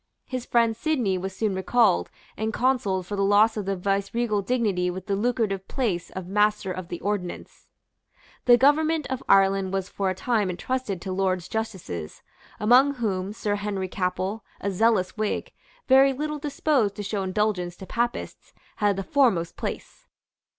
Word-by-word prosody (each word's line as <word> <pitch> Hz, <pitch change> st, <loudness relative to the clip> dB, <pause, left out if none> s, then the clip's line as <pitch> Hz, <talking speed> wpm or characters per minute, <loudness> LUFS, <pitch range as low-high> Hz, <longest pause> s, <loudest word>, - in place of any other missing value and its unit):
His 255 Hz, -2 st, -5 dB
friend 230 Hz, -2 st, +3 dB
Sidney 235 Hz, -9 st, 0 dB
was 190 Hz, +1 st, -5 dB
soon 215 Hz, -3 st, 0 dB
recalled, 190 Hz, +1 st, +2 dB, 0.3 s
and 220 Hz, +1 st, -2 dB
consoled 220 Hz, -7 st, 0 dB
for 205 Hz, -, -4 dB
the 200 Hz, -, -1 dB
loss 205 Hz, +3 st, +4 dB
of 205 Hz, -3 st, -4 dB
the 195 Hz, -, 0 dB
viceregal 200 Hz, +3 st, 0 dB
dignity 200 Hz, -5 st, 0 dB
with 185 Hz, +1 st, -6 dB
the 200 Hz, -, 0 dB
lucrative 205 Hz, -3 st, -1 dB
place 200 Hz, -10 st, -2 dB
of 190 Hz, -1 st, -6 dB
Master 210 Hz, +1 st, +1 dB
of 185 Hz, -1 st, -6 dB
the 175 Hz, -, -6 dB
Ordnance. 200 Hz, -3 st, -4 dB, 0.8 s
The 240 Hz, -1 st, +7 dB
government 310 Hz, +3 st, +3 dB
of 260 Hz, -, -2 dB
Ireland 195 Hz, -1 st, +4 dB
was 195 Hz, 0 st, -2 dB
for 195 Hz, -1 st, -1 dB
a 185 Hz, -, -2 dB
time 215 Hz, -1 st, 0 dB
entrusted 200 Hz, 0 st, -3 dB
to 190 Hz, -, -4 dB
Lords 185 Hz, -2 st, 0 dB
justices, 185 Hz, -, -5 dB, 0.4 s
among 255 Hz, +6 st, +5 dB
whom 200 Hz, -5 st, -2 dB
Sir 210 Hz, -1 st, -2 dB
Henry 200 Hz, -2 st, -3 dB
Capel, 185 Hz, +3 st, -2 dB, 0.2 s
a 200 Hz, -, -2 dB
zealous 195 Hz, -1 st, +2 dB
Whig, 215 Hz, -1 st, -2 dB, 0.3 s
very 270 Hz, +1 st, +6 dB
little 300 Hz, +2 st, -3 dB
disposed 280 Hz, -7 st, 0 dB
to 205 Hz, -, -5 dB
show 200 Hz, 0 st, -2 dB
indulgence 190 Hz, -2 st, -1 dB
to 190 Hz, -, -10 dB
Papists, 235 Hz, +4 st, -3 dB, 0.2 s
had 205 Hz, -1 st, +2 dB
the 195 Hz, -, -3 dB
foremost 195 Hz, -9 st, +2 dB
place. -, -, -6 dB
205 Hz, 165 wpm, -25 LUFS, 190-235 Hz, 0.8 s, The